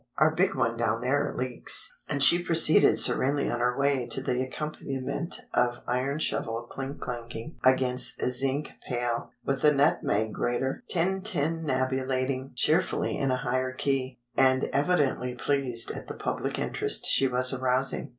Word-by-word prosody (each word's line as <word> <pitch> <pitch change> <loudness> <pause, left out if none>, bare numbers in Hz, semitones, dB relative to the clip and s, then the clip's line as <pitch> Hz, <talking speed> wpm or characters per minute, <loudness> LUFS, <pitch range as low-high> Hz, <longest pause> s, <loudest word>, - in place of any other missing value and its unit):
Our 155 +1 +4
big 190 +4 +1
one 115 0 0
down 115 -1 0
there 135 +3 0
leaks." 125 -1 +2 0.2
And 140 -2 +1
she 175 +6 +7
proceeded 165 -2 +5
serenely 140 +2 +3
on 120 - -2
her 125 +1 0
way 140 -3 +1
to - - 0
the 125 -1 -1
accompaniment 140 +3 -4
of 120 0 0
iron 130 +4 -1
shovel 115 -6 -2
clink 135 +3 -7
clanging 120 +3 -7
against 125 -1 +2
zinc 135 +3 -1 0.2
pail, 120 -2 -2 0.2
with 135 -1 -1
the 150 - +5
nutmeg 110 -6 +1
grater 130 - -2
tintinnabulating 140 -8 -1
cheerfully 160 +9 +1
in 135 -2 -1
a 130 - +1
higher 130 +1 -2
key—and 130 -1 0
evidently 140 -5 0
pleased 125 -3 0
at - - -8
the - - -7
public - - -3
interest - - -1
she 135 - +3
was 125 +1 +3
arousing. 130 +1 -1
130 Hz, 140 wpm, -27 LUFS, 125-145 Hz, 0.2 s, she